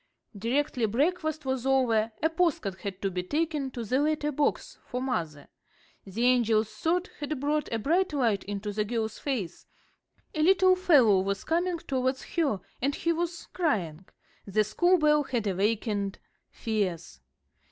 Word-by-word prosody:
Directly 245 +3 0
breakfast 310 - 0
was 260 -2 -1
over 240 -5 +2
a 320 - +4
postcard 285 - 0
had 195 -1 -6
to 195 - 0
be 180 0 -2
taken 300 - -1
to 245 -2 -6
the 250 +5 0
letter 300 0 0
box 290 +1 -1
for 250 - -3
mother. 165 - -3 0.6
The 215 +5 -2
angel's 225 -4 +3
thought 335 - -1
had 295 -1 -3
brought 295 +2 -1
a 230 - 0
bright 340 - +1
light 235 -9 +1
into 205 +1 -4
the 210 +1 0
girl's 220 0 -3
face. 235 - -4 0.7
A 310 - -1
little 370 +2 +5
fellow 275 - +5
was 195 +1 -2
coming 345 +2 0
towards 260 -3 -2
her, 290 - +1 0.2
and 275 +3 0
he 335 0 0
was 340 0 -3
crying; 190 - -1 0.4
the 215 +2 +2
school 350 - +3
bell 300 -2 +4
had 245 -6 -2
awakened 205 +1 0 0.3
fears. 185 - -3
255 Hz, 150 wpm, -28 LUFS, 210-305 Hz, 0.7 s, little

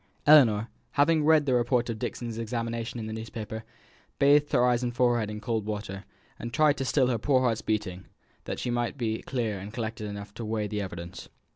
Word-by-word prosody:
Ellinor, 120 -8 +6 0.3
having 155 +2 +3
read 155 -1 +5
the 130 - +1
report 120 0 +2
of 110 - -6
Dixon's 115 -1 -4
examination 115 +1 -3
in 110 - -4
the 110 - -5
newspaper, 110 0 -6 0.5
bathed 145 +1 +4
her 125 -3 +4
eyes 125 -1 +2
and 120 -1 -1
forehead 120 -4 +2
in 105 0 -5
cold 115 -1 -2
water, 105 -2 -5 0.3
and 115 - -5
tried 150 +2 +3
to 135 - -2
still 130 0 +3
her 120 -3 0
poor 130 +2 +3
heart's 115 -3 +1
beating, 95 -4 -3 0.4
that - - -4
she 125 - -2
might 120 +2 -1
be 110 -3 -2
clear 115 -6 -2
and 100 +3 -8
collected 110 -1 -4
enough 100 0 -7
to 115 - -7
weigh 110 -1 -1
the 105 0 -3
evidence. 85 -2 -7
115 Hz, 205 wpm, -28 LUFS, 105-125 Hz, 0.5 s, Ellinor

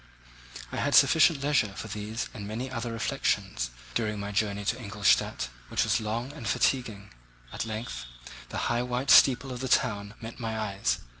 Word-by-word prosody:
I - - -4
had - - +1
sufficient 160 -3 +5
leisure 140 -9 +1
for 110 - -6
these 110 +2 -4
and 105 -4 -7
many 120 +5 -4
other 115 -1 -3
reflections - - -1 0.2
during 105 - -1
my 100 0 -4
journey 100 -1 -1
to 115 +5 -1
Ingolstadt, 100 - +1 0.2
which - - +1
was - - +1
long 115 +5 -3
and 135 -7 -7
fatiguing. 110 -7 0 0.4
At - - -3
length 110 - -5 0.4
the - - -5
high 120 0 +1
white 125 +2 0
steeple 130 0 +6
of 125 - -5
the 130 - -3
town 105 -4 +1
met 115 +2 -8
my 110 -2 -3
eyes. 95 - 0
110 Hz, 170 wpm, -28 LUFS, 100-125 Hz, 0.4 s, steeple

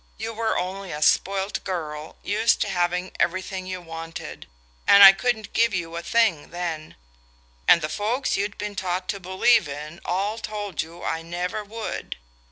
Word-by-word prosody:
You 225 - -4
were 225 0 0
only 190 +1 -4
a 150 0 -2
spoilt 195 +4 +1
girl, 155 -4 -5
used 220 +2 +2
to 205 - 0
having 180 0 0
everything 185 +1 -1
you 185 -1 -5
wanted; 165 -1 -8 0.4
and 200 0 +9
I 195 - +13
couldn't 220 +1 -2
give 230 -3 +3
you 170 -2 -3
a 170 - -3
thing 205 -6 +1
then, 170 -3 -5 0.7
and 170 - +6
the - - 0
folks 220 - -1
you'd 200 +1 -2
been 205 0 -5
taught 185 -1 -2
to 200 - -2
believe 190 +3 +3
in 150 +4 -7
all 200 +5 -1
told 205 -5 -4
you 165 +2 -10
I 160 - -2
never 180 +5 -3
would. 220 +2 -6
185 Hz, 170 wpm, -24 LUFS, 170-210 Hz, 0.7 s, I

